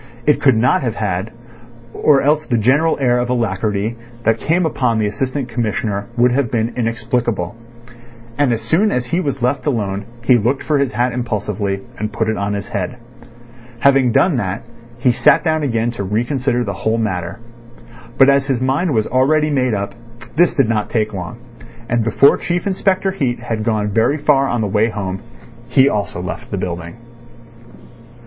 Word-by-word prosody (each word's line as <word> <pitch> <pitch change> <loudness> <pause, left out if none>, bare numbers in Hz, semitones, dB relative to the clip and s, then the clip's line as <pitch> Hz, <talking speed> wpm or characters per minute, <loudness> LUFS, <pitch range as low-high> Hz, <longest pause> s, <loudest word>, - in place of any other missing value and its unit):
It 150 - +3
could 135 -4 +5
not 120 +3 +3
have 120 -4 -2
had, 100 -1 -2 0.6
or 140 -3 +3
else 150 +2 +2
the 120 - +1
general 140 +9 +2
air 125 -2 +2
of 120 0 -2
alacrity 110 -2 -1 0.3
that 115 0 +2
came 170 +3 +1
upon 125 -7 0
the 110 - +1
Assistant 130 +6 -2
Commissioner 110 -3 -2
would 120 +1 +4
have 130 -1 +1
been 115 0 -1
inexplicable. 115 -5 -1 0.8
As 120 -6 +2
soon 185 - +2
as 125 0 -1
he 170 +8 -1
was 140 -7 -3
left 135 +4 0
alone 105 -6 -1 0.2
he 120 0 +5
looked 125 +6 0
for 150 -2 +1
his 140 -5 0
hat 120 +2 0
impulsively, 105 -4 -2 0.2
and 105 0 -3
put 110 0 -1
it 110 - 0
on 100 +1 -2
his 100 0 -5
head. 100 +4 -3 0.9
Having 135 -3 +4
done 170 +1 +3
that, 95 -2 -3 0.3
he 125 +1 +3
sat 120 - +4
down 155 -1 +1
again 120 -4 0
to 110 -4 -5
reconsider 120 +5 0
the 100 - -3
whole 110 +1 +1
matter. 90 -6 -2 0.8
But 135 - +7
as 140 0 +3
his 135 -4 0
mind 135 +4 0
was 110 -1 +2
already 150 +4 +2
made 130 -5 +1
up, 100 0 -3 0.4
this 175 +1 +3
did 135 -7 +3
not 110 -2 -1
take 110 -2 -1
long. 90 +2 -6 0.5
And 120 0 +1
before 115 +5 +4
Chief 175 0 -2
Inspector 195 0 +1
Heat 130 -11 -1
had 115 -2 -3
gone 105 -2 0
very 115 +8 +2
far 145 -2 +3
on 120 -3 -1
the 105 - 0
way 105 +3 +2
home, 95 -3 -4 0.5
he 135 -1 +5
also 105 -7 -1
left - - -6
the - - -3
building. 85 -1 -5
120 Hz, 180 wpm, -18 LUFS, 105-135 Hz, 0.9 s, But